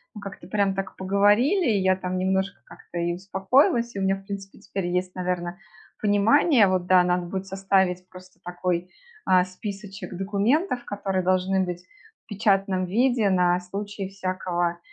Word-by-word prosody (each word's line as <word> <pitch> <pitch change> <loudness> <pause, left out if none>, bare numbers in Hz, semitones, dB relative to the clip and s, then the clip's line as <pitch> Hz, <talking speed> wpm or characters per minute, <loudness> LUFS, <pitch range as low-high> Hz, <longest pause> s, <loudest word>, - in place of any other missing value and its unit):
мы 210 - -8
как-то 195 -3 -9
прям 200 -1 +1
так 195 -1 -5
поговорили, 205 - +3
я 190 -3 +3
там 185 0 -4
немножко 190 +1 -1
как-то 175 - -11
и 170 0 0
успокоилась, 200 +6 +1
и - - -3
у - - -2
меня, 190 0 +2
в 195 - -12
принципе, 195 -1 -7
теперь 195 -2 -4
есть, 180 +1 -1
наверно, 180 0 -3 0.4
понимание. 220 +5 +4
Вот 185 -1 0
да, 185 -1 +6
надо 180 0 0
будет 190 +2 -4
составить 190 -1 0
просто 185 0 -15
такой, 180 0 -2 0.4
а, 185 -1 +4
списочек 200 +2 -8
документов, 230 - 0
которые 195 -2 -2
должны 185 +1 +2
быть 180 -1 -5 0.4
в - - -81
печатном 195 -3 +1
виде 230 +1 +2
на 180 -1 +3
случай 195 +1 -6
всякого 180 -3 -2
190 Hz, 155 wpm, -25 LUFS, 180-205 Hz, 0.4 s, да